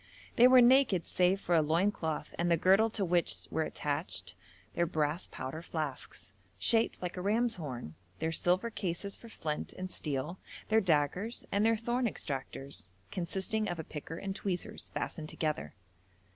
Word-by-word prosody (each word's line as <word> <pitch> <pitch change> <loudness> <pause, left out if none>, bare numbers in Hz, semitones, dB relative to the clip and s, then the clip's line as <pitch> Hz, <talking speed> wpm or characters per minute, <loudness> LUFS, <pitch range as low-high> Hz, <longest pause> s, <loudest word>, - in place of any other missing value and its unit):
They 245 - +8
were 255 0 +8
naked 240 -8 +5
save 180 +2 +3
for 175 - -1
a 165 - +6
loin 165 +7 +3
cloth 160 -5 -3
and 175 0 +2
the 170 - +4
girdle 195 +7 +5
to 210 -3 -1
which 175 -1 +1
were 160 - +1
attached 145 - -3 0.4
their 170 - +1
brass 155 0 0
powder 135 +5 -5
flasks, 150 - -4 0.2
shaped 225 - +2
like 180 +1 -3
a - - -2
ram's 225 +4 +2
horn, 125 - -5 0.2
their 160 - -1
silver 180 +7 +1
cases 195 -1 -3
for 230 - -13
flint 150 -8 -4
and 185 0 -6
steel, 150 +4 -3 0.3
their 220 0 +5
daggers, 180 - +1
and 200 +1 +2
their 225 0 +4
thorn 240 +2 0
extractors, 135 - -5 0.2
consisting 190 +4 -1
of 175 - -2
a 160 - -4
picker 155 +2 -7
and 195 +1 -4
tweezers, 190 -3 -3
fastened 155 -3 -3
together. 150 - -2
175 Hz, 165 wpm, -32 LUFS, 155-205 Hz, 0.4 s, They